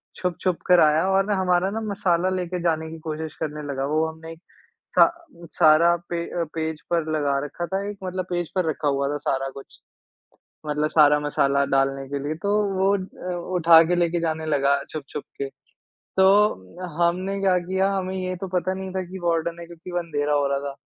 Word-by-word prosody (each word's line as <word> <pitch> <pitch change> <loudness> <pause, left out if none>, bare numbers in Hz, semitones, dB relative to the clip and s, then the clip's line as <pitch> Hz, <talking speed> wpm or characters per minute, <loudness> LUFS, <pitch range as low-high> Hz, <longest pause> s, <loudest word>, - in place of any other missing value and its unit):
छुप-छुप 180 0 -1
कर 180 -1 +6
आया 155 +2 +4
और 195 0 +3
ना 205 0 0
हमारा 180 0 +2
ना 225 +1 -3
मसाला 185 -4 0
लेके 180 0 -3
जाने 160 -1 0
की 165 - -8
कोशिश 155 0 -4
करने 150 -1 -4
लगा। 135 0 -2
वो 155 +1 +2
हमने 160 0 -9
एक 165 - -18 0.5
सा - - +8 0.5
सारा 165 +2 +6
पे 170 -1 -2 0.3
पेज 160 -1 -3
पर 165 -2 0
लगा 145 -3 +1
रखा 175 +4 -5
था 190 +3 -2
एक, 205 - -7
मतलब 185 0 -3
पेज 175 -2 -2
पर 185 -2 +1
रखा 150 -1 -2
हुआ 140 -1 +1
था - - -1
सारा 135 -1 -2
कुछ। 135 - -13 0.9
मतलब 150 +1 0
सारा 150 -2 +5
मसाला 140 -1 +1
डालने 135 0 +1
के 140 +1 -3
लिए, 155 +2 -2
तो 200 +6 -3 0.3
वो 195 +1 +3
अ, 185 -1 -6 0.2
उठा 165 -1 +7
के 180 - +2
लेके 175 0 +1
जाने 160 -1 -2
लगा, 140 -2 +2
छुप-छुप 150 -1 -6
के। 140 - -2 0.7
तो 190 - +3 0.2
हमने 185 +3 0
क्या 190 -2 +3
किया, 190 +2 0
हमें 185 -1 -2
ये 185 0 -3
तो 190 +2 -6
पता 185 +2 -2
नहीं 190 0 -6
था 190 - -1
कि 190 - -6
वार्डन 170 0 0
है 170 - -8
क्योंकि 170 +1 -11
वो 175 - 0
अंधेरा 150 -4 -2
हो 145 -1 +2
रहा 140 0 0
था। 135 - -11
170 Hz, 200 wpm, -24 LUFS, 150-185 Hz, 0.9 s, सा